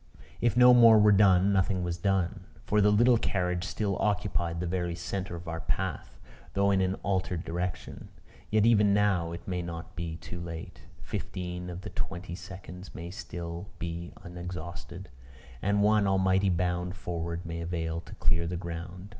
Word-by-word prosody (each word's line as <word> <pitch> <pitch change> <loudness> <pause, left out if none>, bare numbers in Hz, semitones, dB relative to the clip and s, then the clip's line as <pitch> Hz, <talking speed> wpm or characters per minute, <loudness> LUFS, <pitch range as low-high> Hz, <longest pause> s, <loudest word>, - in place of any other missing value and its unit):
If 120 0 +1
no 125 0 +9
more 115 -2 +8
were 105 0 +6
done, 100 -1 +5
nothing 95 -1 +1
was 90 -1 -1
done; 95 0 0 0.2
for 105 0 +3
the 105 - +5
little 120 +3 +5
carriage 90 -4 0
still 100 0 -2
occupied 100 -5 0
the 90 - -2
very 85 -1 -1
centre 95 0 -4
of 85 +1 -9
our 80 0 -3
path, - - -3 0.4
though 100 0 +3
in 95 -1 +3
an 95 0 +1
altered 95 -3 -1
direction. 90 +2 -4 0.4
Yet 110 0 +3
even 105 -3 +5
now 95 -5 +2
it 85 0 -8
may 90 -1 -1
not 85 -1 -7
be 85 -1 -4
too 85 +2 -8
late: 85 -1 -7 0.2
fifteen 90 -1 -5
of 90 +1 -6
the 105 - -7
twenty 90 -1 -5
seconds 90 0 -9
may 85 +2 -6
still 85 0 -6
be 85 +1 -5
unexhausted; 85 0 -7 0.5
and 100 +1 +2
one 105 -1 +4
almighty 95 0 +3
bound 90 0 0
forward 85 -1 -4
may 85 0 -4
avail 85 -1 -2
to - - -12
clear 85 +1 +1
the 90 +1 -3
ground. 90 +2 -6
90 Hz, 170 wpm, -29 LUFS, 85-100 Hz, 0.5 s, no